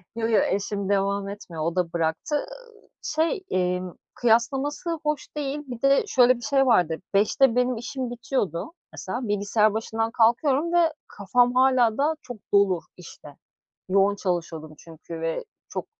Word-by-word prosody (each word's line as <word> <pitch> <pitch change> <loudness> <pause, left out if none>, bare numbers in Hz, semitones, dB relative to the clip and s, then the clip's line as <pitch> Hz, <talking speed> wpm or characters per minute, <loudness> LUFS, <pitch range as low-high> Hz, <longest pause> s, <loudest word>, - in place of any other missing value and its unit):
Yo, 225 -1 -1
yo, 225 - +4
eşim 200 0 -2
devam 200 0 0
etmiyor, 175 -6 -7
o 165 +2 -1
da 180 -2 -1
bıraktı. 165 - -1
Iıı, 480 +4 -7
şey, 320 +5 -1
emm, 180 -1 -1 0.2
kıyaslaması 270 +8 0
hoş 300 -1 -2
değil. 285 0 -2
Bir 245 -2 -7
de 275 +6 +4
şöyle 250 -4 +5
bir - - -13
şey 270 +2 +2
vardı 175 -10 +3 0.2
17.00'de 225 +5 +3
benim 250 0 +2
işim 250 +2 -4
bitiyordu 240 - -3 0.2
mesela 245 -1 -5
bilgisayar 205 +1 +2
başından 225 +1 -2
kalkıyorum 270 +8 +2
ve 335 -2 +3
kafam 245 +5 +1
hâlâ 255 -3 +4
daha 295 +3 +2
çok 245 -3 -9 0.2
dolu, 200 -3 +4 0.2
işte, 150 -4 -13 0.5
yoğun 195 +1 +3
çalışıyordum 165 -5 -3
çünkü 165 +1 -10
ve 165 0 -2 0.2
çok - - -5
225 Hz, 150 wpm, -25 LUFS, 190-270 Hz, 0.5 s, şöyle